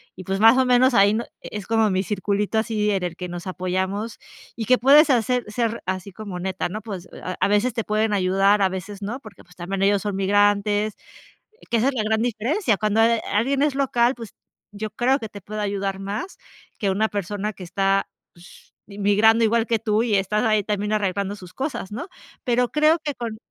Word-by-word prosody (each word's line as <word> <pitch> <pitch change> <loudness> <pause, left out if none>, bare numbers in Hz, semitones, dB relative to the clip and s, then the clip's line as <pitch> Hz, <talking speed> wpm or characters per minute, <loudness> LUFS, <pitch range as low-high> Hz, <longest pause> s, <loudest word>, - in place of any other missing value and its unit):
y 185 - -9
pues 195 +2 -2
más 225 +4 +7
o 260 - +4
menos 250 +1 +4
ahí 200 -1 +5
no 235 - -1 0.2
es 210 -2 -7
como 225 0 +2
mi 190 0 0
circulito 205 +2 -1
así 215 -1 0
en 195 -2 -1
el 175 -1 -3
que 180 - -6
nos 175 +2 -7
apoyamos, 190 +4 -3 0.4
y 225 - -4
que 255 +3 +4
puedes 285 +5 +6
hacer 250 -1 +2
ser 230 0 -1
así 185 +1 -4
como 200 -2 -7
neta, 185 -1 -3
¿no? 215 +4 -5
Pues 195 -5 -7 0.2
a 185 - -4
a - - +2
veces 210 +4 +2
te 230 - -2
pueden 215 0 0
ayudar, 195 +1 +3
a 190 - +3
veces 190 +2 -7
no, 220 +6 -4
porque 215 -6 -14
pues 180 +1 -21
también 190 +2 -4
ellos 200 0 +3
son 205 -1 -3
migrantes, 205 +1 +2 0.8
que 235 - +2
esa 230 +4 +2
es 275 - -1
la 230 - 0
gran 220 +1 +1
diferencia. 240 - 0
Cuando, 215 +2 +1
eh, 230 0 +3
alguien 270 +7 +1
es 295 -2 +2
local, 250 -2 +2
pues 230 -4 -10 0.4
yo 215 +1 -5
creo 250 +6 +1
que 220 - -6
te 205 -2 -11
puede 215 +2 -6
ayudar 200 -1 -2
más 205 - -5 0.4
que 200 - 0
una 215 +3 +1
persona 205 +1 -3
que 190 - -12
está, 195 +2 0 0.2
pues, 175 +1 -18
migrando 210 +3 +3
igual 225 +1 +2
que 230 -1 +1
tú, 215 0 +1
y 230 -3 0
estás 200 +3 +1
ahí 215 -3 +2
también 210 +1 -2
arreglando 200 0 -1
sus 180 -2 -12
cosas, 265 -7 -4
¿no? 290 - -5 0.4
Pero 245 0 +2
creo 305 +2 +3
que 290 -2 -3
con 230 -3 -5
210 Hz, 210 wpm, -23 LUFS, 195-230 Hz, 0.8 s, más